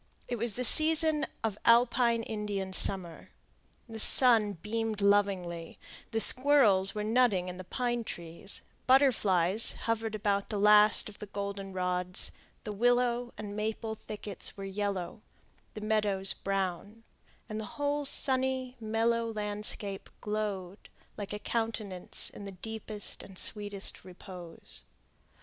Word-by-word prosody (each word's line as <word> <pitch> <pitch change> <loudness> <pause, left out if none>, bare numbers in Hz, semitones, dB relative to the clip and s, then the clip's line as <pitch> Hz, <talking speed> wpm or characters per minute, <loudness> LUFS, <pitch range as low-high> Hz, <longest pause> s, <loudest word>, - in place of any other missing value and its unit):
It 240 - -3
was 235 -1 0
the 250 - -2
season 310 +2 +5 0.2
of 215 -2 -2
alpine 235 0 +3
Indian 205 -4 -4
summer. 180 -3 0 0.6
The 225 -1 -7
sun 225 -3 +5
beamed 215 +4 -4
lovingly; 195 -5 0 0.3
the 225 - -1
squirrels 225 -6 +6
were 210 - -2
nutting 215 -5 +2
in 180 - -8
the 185 - -8
pine 240 +5 -2
trees, 170 -1 -7 0.2
butterflies 215 -7 +3
hovered 225 -1 -2
about 200 -1 -1
the 210 - -3
last 210 +1 +5
of 210 - -12
the 210 - -8
goldenrods, 190 -2 -3 0.3
the 210 - -5
willow 245 +2 +1
and 205 -1 -7
maple 220 +1 -3
thickets 210 -2 -5
were 195 - -6
yellow, 195 -1 -4 0.5
the 215 - -7
meadows 210 -3 +1
brown, 195 +3 -4 0.4
and 215 -1 -5
the - - -6
whole 290 0 -1
sunny, 260 -2 +1
mellow 230 +1 0
landscape 210 -2 -3
glowed 205 -3 -5 0.3
like 205 -2 -7
a 205 - -3
countenance 215 -4 -3
in 200 - -10
the 200 - -7
deepest 215 +2 -7
and 190 -2 -13
sweetest 205 -1 -4
repose. 180 -2 -10
210 Hz, 125 wpm, -30 LUFS, 195-230 Hz, 0.6 s, squirrels